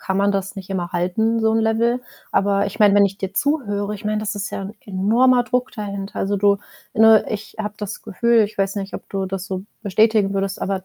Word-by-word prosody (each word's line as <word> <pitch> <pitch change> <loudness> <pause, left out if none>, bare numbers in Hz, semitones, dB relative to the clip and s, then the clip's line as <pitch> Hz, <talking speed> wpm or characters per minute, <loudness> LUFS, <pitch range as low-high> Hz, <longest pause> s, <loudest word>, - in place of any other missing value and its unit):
kann 190 - -2
man 200 +1 +3
das 195 -1 -2
nicht 195 -1 -9
immer 175 -2 -3
halten, 220 +6 0
so 220 - +3
'n 225 - +2
Level. 225 +2 +1 0.3
Aber 200 0 +2
ich 200 - -7
meine, 205 -2 +6
wenn 205 0 +6
ich 195 0 -2
dir 195 -1 -5
zuhöre 205 -8 0
ich 205 - -10
meine, 215 0 0
das 215 -1 -3
ist 205 +1 -4
ja - - -4
'n 195 +2 -6
enormer 230 +6 +3
Druck 250 +1 -1
dahinter. 200 -2 -5
Also, 200 +1 0
du 200 0 +3 0.4
ne, 220 -1 +6
ich 215 0 -6
habe 210 -1 -3
das 210 -2 -6
Gefühl 230 +3 +2
ich 210 +1 -7
weiß 195 0 -1
nicht, 195 -1 -5
ob - - -8
du 195 -1 -2
das 190 0 -4
so 190 -1 -4 0.2
bestätigen 215 0 +3
würdest, 195 0 -2
aber, 190 -1 -2
205 Hz, 230 wpm, -21 LUFS, 195-220 Hz, 0.4 s, meine